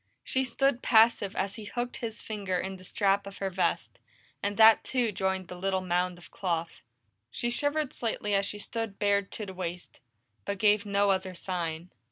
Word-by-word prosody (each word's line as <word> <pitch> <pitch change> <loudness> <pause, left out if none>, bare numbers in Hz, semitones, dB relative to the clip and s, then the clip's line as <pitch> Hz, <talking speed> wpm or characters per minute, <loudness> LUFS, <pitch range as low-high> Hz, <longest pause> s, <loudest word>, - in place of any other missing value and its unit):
She 265 - 0
stood 260 0 +1
passive 220 -3 +4
as 195 +3 -2
he 215 - -8
hooked 240 +3 -3
his 225 -2 -5
finger 200 -4 -3
in 190 +1 -4
the 185 - -14
strap 200 +1 +1
of 200 - -9
her 195 -1 -2
vest, 185 +1 -1 0.4
and 205 0 -2
that 220 0 +8
too 245 -4 0
joined 190 -1 -1
the 180 - -8
little 190 +1 0
mound 180 0 0
of 175 - -15
cloth. 170 -3 -3 0.5
She 240 - -2
shivered 290 +2 0
slightly 215 -3 -2
as 195 0 +2
she 210 - -5
stood 220 -1 -5
bared 200 -1 +2
to 215 - -4
the 190 - -8
waist, 180 -1 -6 0.4
but 200 - -3
gave 210 +1 +3
no 200 0 +3
other 190 -1 -1
sign. 170 -1 -4
200 Hz, 190 wpm, -29 LUFS, 185-220 Hz, 0.5 s, that